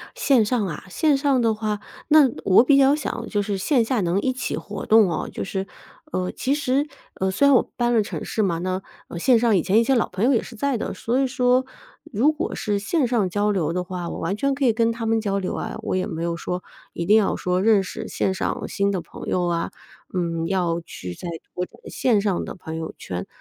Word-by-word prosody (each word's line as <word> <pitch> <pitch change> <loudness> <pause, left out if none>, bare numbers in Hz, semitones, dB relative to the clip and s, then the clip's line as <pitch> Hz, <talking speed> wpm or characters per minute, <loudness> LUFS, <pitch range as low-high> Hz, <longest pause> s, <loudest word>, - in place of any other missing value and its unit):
线 275 - +3
上 215 -1 0
啊 160 -5 -6
线 295 - +2
上 275 -2 +2
的 225 -2 +2
话， 215 -1 -2 0.3
那 300 -4 +6
我 195 +4 +6
比 275 +1 +5
较 275 +1 +5
想 270 -5 -4
就 205 -1 0
是 200 -1 -2
线 240 +5 +2
下 245 0 0
能 180 +1 +1
一 260 - 0
起 255 - -3
活 205 - -6
动 215 -4 +6
哦， - - -2
就 - - -4
是， 190 0 -3 0.5
呃， 180 0 -1
其 270 - -1
实， 285 0 +1 0.3
呃， 190 0 -1
虽 240 +9 +3
然 280 - +6
我 - - +3
搬 240 -1 +1
了 230 - +4
城 205 - -5
市 - - -3
嘛， 175 -5 0
那， 185 +2 -2 0.3
嗯， 170 - -6
线 245 +6 +4
上 225 -3 +3
以 175 - +2
前 210 +4 +3
一 - - +4
些 270 - +3
老 235 - +1
朋 195 +5 -2
友 270 - +4
也 235 - +3
是 245 - -10
在 270 +4 0
的。 - - -4
所 240 +3 -1
以 270 - +2
说 250 0 +2 0.5
如 240 +9 +4
果 305 - -3
是 205 -1 -1
线 250 +7 0
上 230 -6 +1
交 205 +3 0
流 165 -6 0
的 180 - -1
话， 180 -1 -5
我 - - -5
完 195 - -1
全 275 +5 +1
可 275 0 -1
以 235 - +5
跟 230 +1 +2
他 230 0 -5
们 225 0 +2
交 200 -2 -1
流 185 - -3
啊， - - -4
我 - - -1
也 185 - 0
没 165 -5 -4
有 170 0 -1
说 180 +1 -4 0.3
一 170 - -3
定 205 +5 +5
要 215 -3 +3
说 180 0 0
认 215 -1 +4
识 220 +4 -6
线 190 - -1
上 190 - -3
新 200 0 0
的 190 - -1
朋 - - -10
友 180 -1 0
啊， 170 -1 -1 0.4
嗯， 165 -2 -1
要 175 -2 0
去 90 - -8
在 175 - -7 0.3
各 180 - -1
种 - - -20
线 230 -5 +1
上 200 -3 0
的 - - -6
朋 160 -4 -7
友 160 0 -5
圈。 90 0 -5
210 Hz, 265 characters per minute, -23 LUFS, 185-250 Hz, 0.5 s, 那